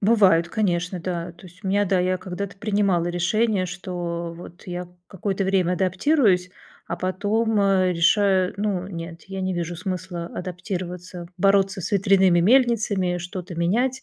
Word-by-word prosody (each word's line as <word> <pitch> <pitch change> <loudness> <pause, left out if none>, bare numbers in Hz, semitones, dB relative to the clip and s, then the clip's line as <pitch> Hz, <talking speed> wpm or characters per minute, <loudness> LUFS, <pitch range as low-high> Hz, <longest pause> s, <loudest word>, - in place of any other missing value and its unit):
Бывают, 195 -6 +4
конечно, 180 -3 -1
да. 170 -1 -4
То 175 +2 -15
есть 185 +4 -18
у 190 - -1
меня, 205 +1 +2
да, 190 -1 +1
я 185 +1 +1
когда-то 190 +2 -6
принимала 200 -4 +1
решение, 185 +3 +1
что 175 -1 -4
вот 175 +1 -12
я 180 0 -5 0.2
какое-то 195 0 -2
время 185 -2 +2
адаптируюсь, 190 - +2 0.4
а - - -3
потом, 210 +4 0
э, 190 -2 +3
решаю. 185 +2 +3
Ну 200 -3 -1
нет, 165 -2 -7
я 195 0 -5
не 185 -1 -1
вижу 175 0 -3
смысла 180 -1 -4
адаптироваться, 180 -1 -6
бороться 195 +1 +2
с 180 - -4
ветряными 190 -2 +4
мельницами, 210 -5 +3
что-то 180 +1 -7
менять. 245 +10 0
185 Hz, 150 wpm, -23 LUFS, 175-200 Hz, 0.4 s, Бывают